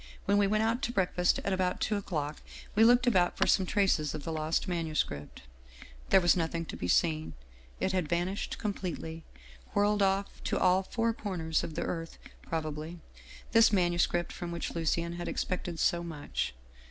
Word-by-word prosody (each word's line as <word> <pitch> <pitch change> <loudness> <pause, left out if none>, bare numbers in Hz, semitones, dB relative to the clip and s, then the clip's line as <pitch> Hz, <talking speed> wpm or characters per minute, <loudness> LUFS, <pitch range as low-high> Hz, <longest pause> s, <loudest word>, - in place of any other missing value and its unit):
When 200 +1 +3
we 200 - +4
went 215 +2 +2
out 230 +3 +1
to 260 - -1
breakfast 180 -4 +2
at 195 - 0
about 185 -1 0
two 215 - 0
o'clock, 155 -7 -3 0.3
we 215 - +5
looked 245 +2 +6
about 185 -7 +3
for - - +3
some 190 -2 +3
traces 185 -8 +1
of 150 - -6
the 165 - -4
lost 155 +4 -1
manuscript. 155 - -2 0.4
" - - -18
There - - +7
was 175 -2 +4
nothing 165 -1 -1
to - - -7
be 90 - -4
seen. 155 - +1 0.5
It 190 - 0
had 180 -5 -1
vanished 175 +3 -1
com 210 -2 -2
pletely, 165 -3 -5 0.5
whirled 205 0 +3
off 195 0 0
to - - 0
all 185 +1 +4
four 230 +4 -1
corners 175 -7 -2
of 155 - -5
the - - -1
earth 165 -1 -4 0.2
prob 160 -1 -3
ably, 155 +3 -5 0.5
this 225 -1 +6
manuscript 175 -2 +1
from 175 -1 -5
which 170 - -4
Lucien 170 +1 -1
had 175 - -4
expected 180 -2 -3
so 170 0 +2
much. 150 - -4
175 Hz, 185 wpm, -30 LUFS, 160-200 Hz, 0.5 s, There